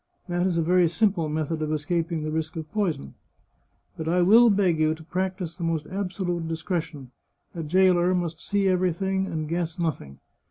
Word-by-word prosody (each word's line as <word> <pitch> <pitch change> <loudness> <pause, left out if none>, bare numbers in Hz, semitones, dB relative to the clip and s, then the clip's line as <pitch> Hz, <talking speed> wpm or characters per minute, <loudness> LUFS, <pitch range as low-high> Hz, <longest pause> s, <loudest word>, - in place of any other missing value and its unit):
That 175 +1 0
is 175 -2 0
a 165 - +2
very 180 +1 +4
simple 180 -3 +1
method 155 +1 -2
of 155 - -1
escap 160 +3 -1
ing 160 -2 -2
the 155 - -3
risk 160 +1 -3
of 160 -2 -6
poison. 170 - -2 0.8
But 160 - -5
I 175 +2 +3
will 230 +6 +7
beg 190 -6 +2
you 155 0 +2
to 160 - -13
practise 185 0 -3
the 175 - -7
most 165 -2 -1
absolute 180 -3 -3
discretion; 160 -5 -4 0.4
a 170 - -5
jailer 180 +2 +3
must 170 -2 -3
see 200 -1 0
everything, 190 +1 0
and 155 -3 -3
guess 170 0 -2
nothing. 145 - -3
170 Hz, 185 wpm, -25 LUFS, 160-185 Hz, 0.8 s, will